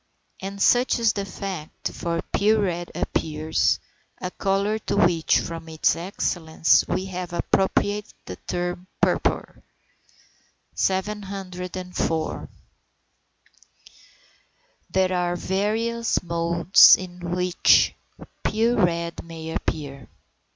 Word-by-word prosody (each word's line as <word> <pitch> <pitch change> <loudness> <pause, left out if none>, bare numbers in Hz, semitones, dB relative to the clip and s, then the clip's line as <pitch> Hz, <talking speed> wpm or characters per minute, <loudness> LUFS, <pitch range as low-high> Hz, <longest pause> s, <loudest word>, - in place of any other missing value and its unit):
And 195 +1 -6
such 245 +5 +4
is 230 -2 +2
the 200 -1 -3
fact, 185 -5 -6
for 170 -1 -3
pure 215 +1 +3
red 175 -2 -2
appears; 155 0 0 0.4
a 180 - -4
colour 200 +3 0
to - - -3
which, 170 -2 +3
from 165 -1 -6
its 160 -1 +2
excellence, 165 -2 +1
we 185 - -1
have 180 -2 -6
appropriated 205 +3 0
the 90 - -7
term 175 0 -4
"purpur." - - 0 1.1
704. 185 -4 -3 2.4
There 185 -1 +1
are 175 -1 0
various 220 +6 -1
modes 170 +1 +6
in 180 -1 -8 0.2
which 180 0 +4 0.5
pure 225 0 +2
red 170 -1 -1
may 160 -1 -8
appear. 140 -4 -4
180 Hz, 95 wpm, -24 LUFS, 170-200 Hz, 2.4 s, modes